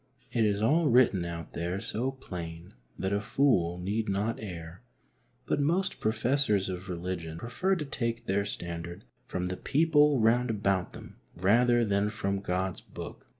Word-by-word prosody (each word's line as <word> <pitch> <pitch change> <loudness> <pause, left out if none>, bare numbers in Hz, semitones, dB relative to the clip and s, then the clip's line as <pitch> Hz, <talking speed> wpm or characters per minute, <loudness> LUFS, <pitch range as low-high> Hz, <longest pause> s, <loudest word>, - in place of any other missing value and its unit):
It 120 -2 +2
is 105 0 +1
all 155 +7 +4
written 115 -7 +4
out 85 -2 -6
there 85 +3 -2
so 115 +3 -2
plain 90 -10 -7 0.2
that 95 +1 -1
a 100 - +1
fool 105 -8 +2
need 100 +4 -2
not 105 +4 -1
err; 85 -2 -7 0.6
but - - 0
most 180 +6 +1
professors 110 -2 +2
of 95 +1 -5
religion 85 -2 -4
prefer 125 - 0
to 155 -4 -3
take 115 -4 -3
their 100 +1 +1
standard, 85 -1 -6 0.2
from 90 0 -2
the 90 - -3
people 150 -2 +3
round 120 +3 +3
about 100 -4 0
them - - -11 0.2
rather 120 +6 +4
than 100 0 +1
from 100 -2 -2
God's 95 -1 -2
Book. - - -9
100 Hz, 155 wpm, -29 LUFS, 90-120 Hz, 0.6 s, all